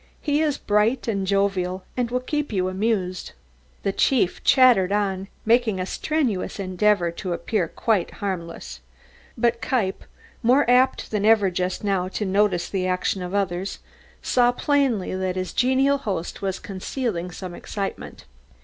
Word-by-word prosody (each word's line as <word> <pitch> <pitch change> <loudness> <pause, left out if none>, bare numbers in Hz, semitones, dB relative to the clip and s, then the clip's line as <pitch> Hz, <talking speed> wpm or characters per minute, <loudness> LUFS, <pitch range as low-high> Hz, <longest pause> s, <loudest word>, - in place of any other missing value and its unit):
He 295 0 +1
is 295 -3 +1
bright 215 +5 +1
and 195 -4 -1
jovial 190 -2 0
and 245 -2 -1
will 250 +1 -1
keep 295 +2 -2
you 185 -3 0
amused." 185 -2 -2 0.5
The 195 - +1
chief 235 -7 +1
chattered 245 -9 +5
on, 195 -2 0 0.2
making 225 -3 +3
a 185 - -1
strenuous 245 -4 -1
endeavour 185 -1 +1
to 175 +1 -4
appear 180 0 -1
quite 205 +1 0
harmless. 170 - -5 0.6
But 235 0 +1
Kniepp, 210 -7 -1 0.4
more 255 +3 +4
apt 250 +2 +3
than 210 -2 0
ever 210 -3 +4
just 180 +2 -2
now 195 -3 0
to 205 +2 -3
notice 190 -2 +1
the 185 -2 -2
actions 185 +1 -1
of 180 +3 -5
others, 190 -1 -1 0.5
saw 245 -1 +3
plainly 265 -7 +1
that 185 -1 -2
his 185 -1 -3
genial 265 +3 +3
host 190 -9 -4
was 195 -1 -2
concealing 190 -2 -4
some 180 +1 -7
excitement. 195 +2 -6
200 Hz, 150 wpm, -23 LUFS, 185-240 Hz, 0.6 s, chattered